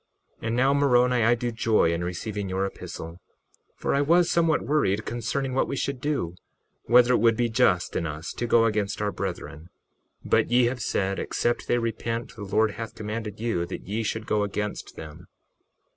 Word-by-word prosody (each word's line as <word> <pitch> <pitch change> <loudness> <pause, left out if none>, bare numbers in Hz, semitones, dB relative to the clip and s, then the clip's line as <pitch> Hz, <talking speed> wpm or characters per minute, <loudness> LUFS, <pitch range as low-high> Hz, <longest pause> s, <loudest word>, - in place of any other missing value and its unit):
61:19 - - -4
And 115 - 0
now, 135 +3 +3
Moroni, 125 -3 +3
I 115 +2 +4
do 120 0 -3
joy 110 -6 +2
in 85 +1 -2
receiving 100 +3 -4
your 95 +1 0
epistle, 85 -3 -7 0.6
for - - -1
I 140 - +2
was 170 +4 +4
somewhat 165 -2 +2
worried 110 -9 +1
concerning 130 +3 -2
what 135 - +1
we - - -3
should 140 -1 -3
do, 140 - -1 0.5
whether 125 +1 +5
it 120 - +3
should 115 -1 +4
be 120 -1 +1
just 110 -7 +2
in 85 - -1
us 75 +2 -6
to 120 - -3
go 115 0 +4
against 105 -3 -1
our 105 -1 0
brethren. 80 -3 -6 0.6
61:20 - - -8
But - - +3
ye 120 +1 +4
have 125 +1 -1
said, 100 -2 -1
except 120 - -1
they 120 - +2
repent 115 0 -3
the 110 - -10
Lord 105 +2 +2
hath 115 +1 -7
commanded 105 -1 -5
you 110 -7 -1
that 95 - -6
ye 105 +3 -2
should 110 0 -3
go 105 0 +1
against 105 0 -4
them. 80 +3 -10
115 Hz, 195 wpm, -26 LUFS, 100-125 Hz, 0.6 s, whether